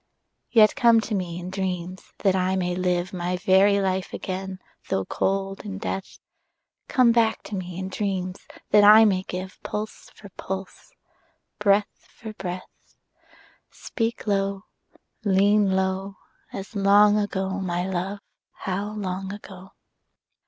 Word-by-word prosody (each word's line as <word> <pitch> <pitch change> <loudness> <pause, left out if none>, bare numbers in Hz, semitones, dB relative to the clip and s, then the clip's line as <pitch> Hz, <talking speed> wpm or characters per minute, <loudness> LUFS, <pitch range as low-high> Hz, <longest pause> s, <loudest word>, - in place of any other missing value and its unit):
Yet 215 -2 +5
come 235 -2 +5
to 220 - -5
me 180 -3 -3
in 180 +1 -7
dreams, 185 -1 -4
that 195 -2 +4
I 185 0 +1
may 180 -1 -1
live 180 0 -1
My 180 0 -2
very 195 +2 +4
life 190 -1 -1
again 190 0 -5 0.3
though 95 0 0
cold 195 0 -2
in 200 -2 -6
death: 195 -2 -5 0.7
Come 255 -4 +4
back 230 -1 +2
to 210 - -6
me 180 -2 -5
in 190 0 -4
dreams, 190 -2 -3 0.2
that 210 0 +6
I 215 +2 +9
may 190 -3 +2
give 185 0 -7
Pulse 215 +1 -6
for 200 - -13
pulse, 190 - -7 0.7
breath 205 0 +1
for 220 -2 -8
breath: 180 -2 -8 0.7
Speak 230 -1 -4
low, 195 -1 0 0.6
lean 200 0 +3
low, 190 +1 -1 0.3
As 195 +2 -8
long 205 +1 +5
ago, 190 -1 -2
my 180 -1 -2
love, 190 +2 -3 0.3
how 200 +2 -4
long 190 -2 -4
ago! 195 -2 -11
195 Hz, 135 wpm, -24 LUFS, 185-205 Hz, 0.7 s, I